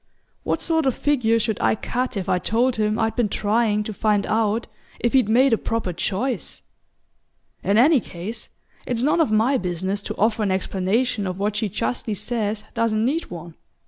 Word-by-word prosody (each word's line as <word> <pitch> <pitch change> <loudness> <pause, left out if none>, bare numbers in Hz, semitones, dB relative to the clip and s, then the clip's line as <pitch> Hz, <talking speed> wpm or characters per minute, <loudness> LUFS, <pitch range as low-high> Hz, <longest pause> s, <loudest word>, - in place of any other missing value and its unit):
What - - -1
sort 320 -3 +1
of 260 - +1
figure 245 -6 +2
should 220 -1 -1
I - - +3
cut 245 +1 -3
if 190 - -3
I 180 - +2
told 240 +6 +1
him 215 0 +1
I'd 225 -1 0
been 235 -4 +1
trying 210 +1 +1
to 215 - -5
find 210 0 +1
out 220 +1 +1 0.3
if 235 - 0
he'd 255 -6 +4
made 250 +3 +4
a 225 - +2
proper 225 -6 -2
choice? 225 +9 -2 1.0
In 200 +2 +2
any 280 +5 +6
case, 200 +2 -7 0.4
it's 245 -1 -1
none 305 +4 +3
of 315 - +2
my 230 +5 +3
business 190 +2 -2
to - - -6
offer 220 +1 +2
an 205 - +1
explanation 195 +3 0
of 185 0 -4
what 205 +1 -1
she 210 0 -1
justly 220 +2 -2
says 210 0 -2
doesn't 225 -2 +1
need 310 +7 -1
one. 170 -1 -8
220 Hz, 185 wpm, -23 LUFS, 205-240 Hz, 1.0 s, any